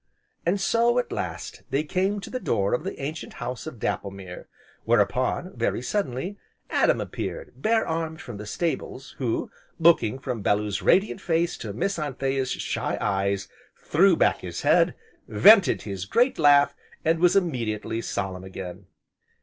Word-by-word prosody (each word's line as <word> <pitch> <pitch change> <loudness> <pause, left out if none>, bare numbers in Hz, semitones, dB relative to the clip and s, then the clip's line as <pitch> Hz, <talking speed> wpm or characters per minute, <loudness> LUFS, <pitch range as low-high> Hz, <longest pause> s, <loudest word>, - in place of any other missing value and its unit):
And 195 +4 +2
so, 235 +4 +2
at 245 - 0
last, - - -5
they 140 +2 0
came 190 +6 0
to - - -9
the 255 - -2
door 100 - 0
of 125 - 0
the 190 - -5
ancient 150 +3 -5
House 125 +3 -5
of 155 - -7
Dapplemere. 100 -3 -5 0.4
Whereupon, 120 - +1
very 115 0 -1
suddenly, 185 +3 -2 0.3
Adam - - +3
appeared, - - -5
bare 225 +1 +2
armed 160 -1 -3
from 120 -4 -8
the 105 +1 -8
stables, 140 -1 -3
who, 120 -4 -1 0.3
looking 160 -8 +4
from 125 -4 -4
Bellew's 105 0 0
radiant 195 0 +3
face 170 -1 0
to 110 - -6
Miss 170 - -2
Anthea's 135 -2 -1
shy - - -2
eyes, 100 0 0 0.3
threw 180 +2 +3
back - - +3
his 90 -2 -6
head, - - +4 0.3
vented 175 - +6
his 95 -3 -5
great 245 - +2
laugh, 145 -2 +6 0.3
and 160 +1 +3
was 180 +2 +4
immediately 115 - -1
solemn 95 -4 -4
again. 95 0 -8
135 Hz, 150 wpm, -25 LUFS, 105-175 Hz, 0.4 s, vented